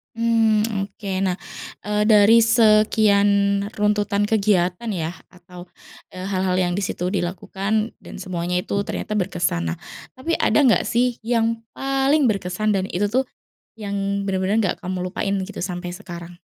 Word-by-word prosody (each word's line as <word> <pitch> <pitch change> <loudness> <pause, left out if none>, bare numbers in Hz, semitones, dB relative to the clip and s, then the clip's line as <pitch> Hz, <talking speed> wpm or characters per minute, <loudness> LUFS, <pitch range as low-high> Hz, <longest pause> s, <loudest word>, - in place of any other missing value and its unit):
Mmm, 225 -2 +2 0.2
oke 195 -2 -3
nah, 185 -1 -1 0.5
eee, 210 0 +1
dari 220 +1 +6
sekian 210 -3 +4
runtutan 205 -1 0
kegiatan 205 0 +1
ya 170 -2 -3 0.2
atau, 180 -1 -13 0.5
eee, 185 +1 -6
hal-hal 185 -1 0
yang 175 -1 +1
di 200 - -2
situ 180 -1 -2
dilakukan 195 +4 -2
dan - - -10
semuanya 180 -1 -2
itu 200 - -4
ternyata 215 +1 -4
berkesan 175 - -1
nah - - -5 0.3
tapi 325 +6 -2
ada - - +2
gak 230 - +4
sih 245 0 +1
yang 230 -1 0
paling 270 +1 +1
berkesan 205 0 0
dan 190 0 -2
itu 205 +3 0
tuh, 255 +5 +1 0.5
yang 200 -2 -2
bener-bener 195 +3 0
gak - - -6
kamu 180 0 -4
lupain 200 +1 -1
gitu 205 - -8
sampai 175 -1 -4
sekarang? 175 -2 -9
200 Hz, 145 wpm, -22 LUFS, 185-220 Hz, 0.5 s, dari